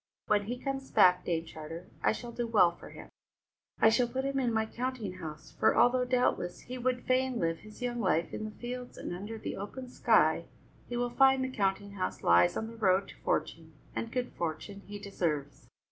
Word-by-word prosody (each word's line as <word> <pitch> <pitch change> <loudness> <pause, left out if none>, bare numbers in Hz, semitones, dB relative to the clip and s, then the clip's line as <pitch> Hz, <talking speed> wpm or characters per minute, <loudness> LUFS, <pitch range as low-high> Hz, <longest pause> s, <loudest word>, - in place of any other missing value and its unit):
When 205 -1 +2
he 245 +4 -3
comes 270 +1 -4
back, 180 0 +5
Dame 165 -1 -1
Charter, 160 +1 -8 0.2
I - - +4
shall 240 +2 -6
do 235 0 -3
well 200 -6 +5
for - - -12
him; - - -11 0.7
I 220 - +7
shall 240 +2 +3
put 260 +3 -3
him 275 0 0
in 245 -3 +1
my 220 -1 +1
counting 235 -6 -4
house, 155 -2 -8
for, - - +2
although 250 +1 +5
doubtless 250 -8 0
he 255 +1 -7
would 250 0 -1
fain 255 0 +2
live 165 -4 0
his 215 +3 -11
young 240 -1 -2
life 170 -6 +1
in 215 - -3
the - - -4
fields 245 0 -6
and - - -5
under 205 +5 -6
the - - -5
open 250 +6 -6
sky, - - +3 0.4
he 240 - -2
will 245 0 0
find 265 +1 +5
the 260 - -1
counting 200 0 0
house 190 -2 -4
lies 85 +1 +5
on 220 - -2
the 230 +1 -9
road 195 -2 +2
to - - -11
fortune, 160 -1 -2 0.2
and 230 - -3
good 250 0 -2
fortune 170 +5 -4
he 205 0 -6
deserves." 165 -8 -3
220 Hz, 205 wpm, -31 LUFS, 180-250 Hz, 0.7 s, I